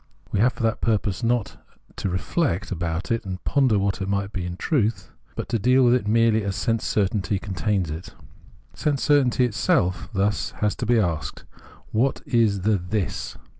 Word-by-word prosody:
We - - 0
have 120 +3 +4
for 120 - -6
that 110 0 0
purpose 105 -2 0
not 120 -2 +1
to - - -11
Sense - - -20
certainty - - -8
93 - - -3
reflect 100 - -1
about 85 0 -3
it 115 - 0
and 90 -2 -6
ponder 130 -7 +3
what 100 0 0
it 95 - -2
might 100 0 -1
be 90 -3 -3
in 90 0 -6
truth, 115 - 0 0.2
but - - -4
to 115 - 0
deal 125 +5 +4
with 120 -1 +5
it 125 -5 +1
merely 110 0 +3
as 100 -1 -2
sense 115 +3 0
certainty 100 0 0
contains 95 -2 -1
it. 80 +3 -8 0.6
Sense 145 -3 -1
certainty 130 -4 +3
itself 105 - 0
has 100 +2 0
thus 105 -1 +1
to 120 - -3
be 120 0 +4
asked: 85 -7 -2 0.5
What 130 +5 +1
is 110 -5 +2
the 105 +2 +2
This 95 +2 -3
105 Hz, 195 wpm, -24 LUFS, 95-120 Hz, 0.6 s, with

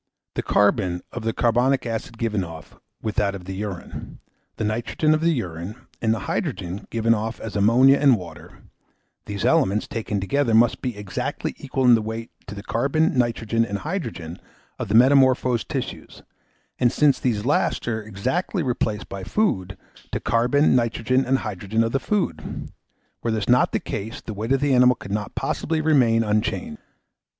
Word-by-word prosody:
The - - -1
carbon 95 -4 +2
of 120 - -5
the 115 - +1
carbonic 125 +4 +2
acid 115 0 -4
given 110 -4 -1
off, 80 -2 -10 0.2
with 110 -1 -3
that 100 -1 +1
of 90 -2 -9
the 95 - -5
urine; 100 -2 -6 0.4
the - - -3
nitrogen 120 +8 +1
of 155 - +1
the 165 - +3
urine, 90 - -4 0.3
and 110 - +2
the 110 -2 -1
hydrogen 90 +1 -3
given 115 0 +2
off 110 +1 -3
as 110 - -7
ammonia 125 +7 +5
and 135 -5 +5
water; 85 -4 -11 0.6
these 100 -2 -3
elements, 100 +3 +2
taken 110 -3 -3
together, 115 +4 +1
must 115 +1 +4
be 125 -5 -3
exactly 105 -2 -3
equal 135 -1 -1
in 120 -3 +6
weight 110 +1 -5 0.2
to 100 - -7
the 100 - -8
carbon, 140 +9 +1
nitrogen, 115 -2 +1
and 100 -3 -3
hydrogen 115 - -5 0.4
of - - -3
the 105 - 0
metamorphosed 130 -1 +4
tissues, - - -5 0.6
and 120 - +3
since 150 -2 +3
these 110 -4 -1
last 145 -2 +1
are 110 -2 -1
exactly 130 - -2
replaced 110 -5 -2
by 100 - -6
the 95 - -8
food, 95 - 0 0.2
to - - -22
the - - 0
carbon, 120 +7 +3
nitrogen, 120 +2 +1
and 135 +1 +2
hydrogen 105 0 -1
of 115 - -1
the 135 - +1
food. 205 +6 -3 0.5
Were 115 - -2
this 110 -2 -1
not 125 +1 +4
the - - 0
case, 110 +3 -5
the 110 - -7
weight 110 +4 -4
of 135 0 +3
the 145 -2 +2
animal 125 0 +6
could 100 - -10
not 105 0 -3
possibly 160 -1 -1
remain 130 -8 +3
unchanged. 115 - -1
115 Hz, 175 wpm, -23 LUFS, 105-130 Hz, 0.6 s, in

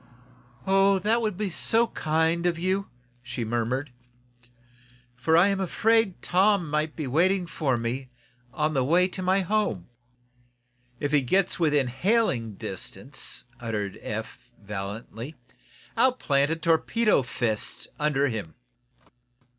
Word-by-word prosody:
"Oh, 195 0 +4
that 215 +5 +1
will 220 - +1
be 200 0 -3
so 225 +7 +3
kind 160 -2 0
of 170 -1 0
you," 190 +3 -1 0.3
she 125 -1 -5
murmured. 120 +4 -1 1.2
"For 145 +6 +2
I 180 +4 +6
am 195 -1 0
afraid 220 +1 +1
Tom 190 -1 +3
might 150 0 -1
be 155 - -4
waiting 175 +8 +2
for 150 -6 -1
me, 125 +3 -3 0.4
on 150 +3 0
the 135 -3 +2
way 175 +7 +4
to 185 - -6
my 185 +1 +2
home 185 - -1 0.6
" 125 0 -40
"If 145 - -2
he 150 -2 +4
gets 185 +9 +1
within 150 -5 +3
hailing 135 - +1
distance," - - -6 0.2
uttered 105 -4 -3
Eph, 110 +3 -6
valiantly, 105 +6 -6 0.6
"I'll 255 +2 +4
plant 140 - +1
a 165 - +1
torpedo 165 +6 +2
fist 115 -3 -2
under 145 -2 +2
him!" 105 - -5
155 Hz, 130 wpm, -26 LUFS, 125-190 Hz, 1.2 s, I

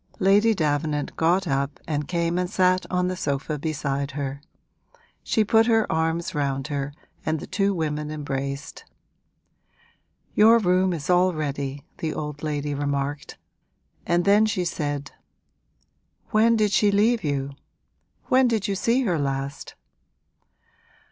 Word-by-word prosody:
Lady 210 +3 +4
Davenant 150 -2 -1
got 175 +3 +2
up 140 0 -1
and 150 -2 -2
came 170 0 0
and 180 -1 -1
sat 185 -1 +2
on 180 0 +1
the 185 - -2
sofa 145 -1 -2
beside 140 -2 -2
her: 140 0 -4 0.8
she 220 - +1
put 225 +2 +4
her 225 -2 +3
arms 160 +1 -1
round 140 -1 -2
her 140 -1 -3 0.3
and 155 0 -1
the - - -7
two 195 +1 0
women 150 -4 -2
embraced. 140 -2 -5 1.5
'Your 225 +2 +6
room 185 -3 +2
is 155 -4 -4
all 180 0 +3
ready,' 140 -2 -4
the 160 -2 -3
old 150 -1 -5
lady 150 -1 -2
remarked. 140 0 -3 0.7
And 175 0 +1
then 205 +2 +5
she 185 -4 -1
said, 145 -4 -3 1.2
'When 225 +2 +4
did 210 -2 +2
she 205 0 +4
leave 220 +4 +2
you? 140 -2 -1 0.7
When 255 0 +4
did 225 -3 0
you 200 - 0
see 230 +7 +1
her 175 -9 0
last?' 135 0 -4
160 Hz, 135 wpm, -24 LUFS, 145-195 Hz, 1.5 s, Your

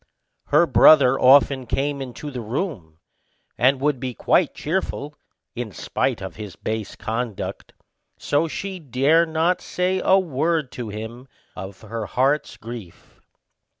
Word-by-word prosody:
Her 150 +4 +5
brother 135 -2 +6
often 135 -1 +5
came 140 +2 -1
into 135 +3 -7
the 125 -3 -5
room, 110 - -4 0.6
and 130 +2 +3
would 145 -1 0
be 125 -1 -4
quite 175 - +2
cheerful, 150 -3 -3 0.4
in 120 -3 -5
spite 95 +2 -2
of 95 - -7
his 105 -5 -8
base 110 +4 -4
conduct; 115 -1 -4 0.4
so 145 +3 0
she 190 +3 -5
dare 150 +4 +2
not 165 +3 +1
say 185 +1 -1
a 190 - +5
word 160 -4 0
to 120 -3 -6
him 110 +5 -7 0.3
of 95 -1 -8
her 110 -1 -5
heart's 135 +4 0
grief. 110 -6 -11
130 Hz, 135 wpm, -22 LUFS, 115-155 Hz, 0.6 s, brother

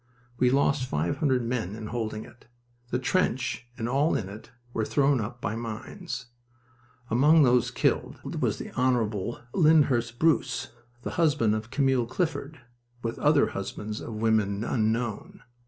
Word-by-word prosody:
We 125 - +4
lost 135 0 +2
five 75 +3 -1
hundred 130 -6 +1
men 115 -5 -2
in 110 0 -7
holding 110 -1 -3
it. 120 - -18 0.4
The 125 - 0
trench 130 -4 0
and 115 -2 -2
all 140 +6 +2
in 95 -3 -2
it 105 +3 -10 0.2
were 110 - 0
thrown 140 +1 +2
up 120 +3 -6
by 105 0 -2
mines. 120 - -6 0.9
Among 150 +7 +6
those 125 -1 +4
killed 125 - 0 0.2
was - - +1
the - - -6
Hon. 120 -4 0
Lyndhurst 140 -8 +3
Bruce, 150 -4 +1 0.3
the - - -3
husband 145 -9 +3
of 110 +1 -3
Camille 130 -2 +2
Clifford, 145 0 -3 0.4
with 115 0 -3
other - - +4
husbands 105 +1 -5
of 115 - -6
women 110 -2 +1
unknown. 115 -1 -1
120 Hz, 145 wpm, -27 LUFS, 110-135 Hz, 0.9 s, Among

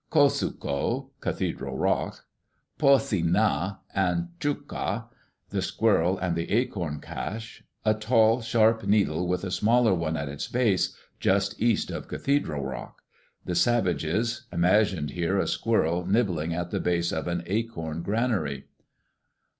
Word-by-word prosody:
] - - -46
"Ko 145 -3 +5
su' - - -2
ko, 70 -1 -2
Cathedral 65 -1 -3
Rock. - - -1 0.5
"Pu 140 -2 +7
si' 110 -10 -1
na, 90 +1 +1 0.2
and 95 - 0
Chuk' 145 -2 -2
ka 115 +4 -3 0.4
(the - - -1
squirrel 90 +4 +2
and 90 -2 -1
the 85 0 -3
acorn 90 - -1
cache), 110 +2 -6 0.2
a 110 - +5
tall, 110 +2 +3
sharp 115 -1 +3
needle, 95 -5 +2
with 90 +1 -1
a 95 - -3
smaller 110 +4 +3
one 80 -2 -1
at 75 -1 -3
its 70 +1 -5
base, 115 -7 +1 0.2
just 100 +2 +1
east 115 -2 +2
of - - -5
Cathedral 80 - -1
Rock.... 65 -2 -7 0.4
The 90 - -2
savages... 115 +4 +1
imagined 90 -3 +2
here 90 +3 0
a - - +2
squirrel 90 -6 +1
nibbling 95 -7 +1
at 85 +1 -3
the - - -1
base 85 -1 0
of 80 - -3
an 85 0 -2
acorn 85 -6 -3
granary. 100 - -1
95 Hz, 145 wpm, -27 LUFS, 85-115 Hz, 0.5 s, Pu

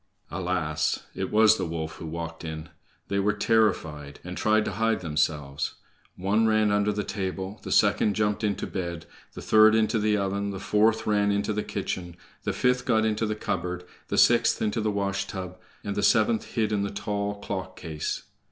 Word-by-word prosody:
Alas! 80 -5 -1
it 95 - -3
was 110 +1 +5
the - - -2
wolf 80 -1 -4
who 80 - -7
walked 85 +1 -6
in. 80 0 -6 0.4
They 100 - 0
were 105 +1 +2
terrified, 90 -10 0
and 90 +1 -6
tried 110 +1 +2
to - - -2
hide 110 +2 0
themselves. 75 -3 -1 0.4
One 105 +4 +2
ran 110 -1 +3
under 105 0 +2
the 105 0 -2
table, 95 0 -4
the - - -7
second 105 -2 +3
jumped 105 0 0
into 105 -2 0
bed, 85 -3 -4 0.3
the - - -8
third 110 0 +6
into 110 +1 +2
the 105 0 +2
oven, 100 +1 -1
the 95 -1 -5
fourth 110 +3 +2
ran 105 -1 +2
into 100 +1 0
the 105 - -1
kitchen, 90 -4 -4 0.3
the - - +1
fifth 125 0 +1
got 110 -3 +3
into 110 0 0
the 105 - -1
cupboard, 90 -3 -3 0.2
the - - -2
sixth - - +5
into 110 +1 0
the 110 - 0
washtub, 100 -2 -3 0.2
and 100 -1 -3
the - - 0
seventh 110 +2 +3
hid 110 -2 +1
in 105 -1 +1
the 100 - -1
tall 100 0 -2
clock 95 -2 -5
case. 80 -3 -4
100 Hz, 185 wpm, -26 LUFS, 90-110 Hz, 0.4 s, third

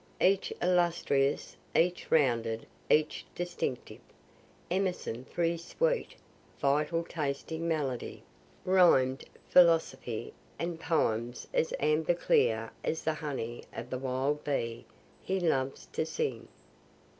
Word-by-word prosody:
Each 195 +1 +3
illustrious, 170 -6 +2 0.2
each 180 +2 +2
rounded, 115 -7 +2 0.2
each 155 0 +2
distinctive. 175 -7 -4 0.7
Emerson 180 -10 -1
for 175 - -2
his 170 0 0
sweet, - - 0 0.4
vital 150 +4 +1
tasting 160 +1 -3
melody, 145 -7 -2 0.4
rhym'd 165 -8 +4 0.2
philosophy, 165 -9 +3 0.2
and 170 -1 -3
poems 120 -8 0
as 160 - +1
amber 155 +3 +2
clear 115 -8 +2
as 160 - -2
the 160 - +1
honey 135 -7 -4
of 120 +2 -7
the 130 - -2
wild 135 +3 -1
bee 115 -5 -2 0.4
he 190 0 -1
loves 135 -6 0
to - - 0
sing. 130 -7 -3
155 Hz, 110 wpm, -31 LUFS, 130-170 Hz, 0.7 s, rhym'd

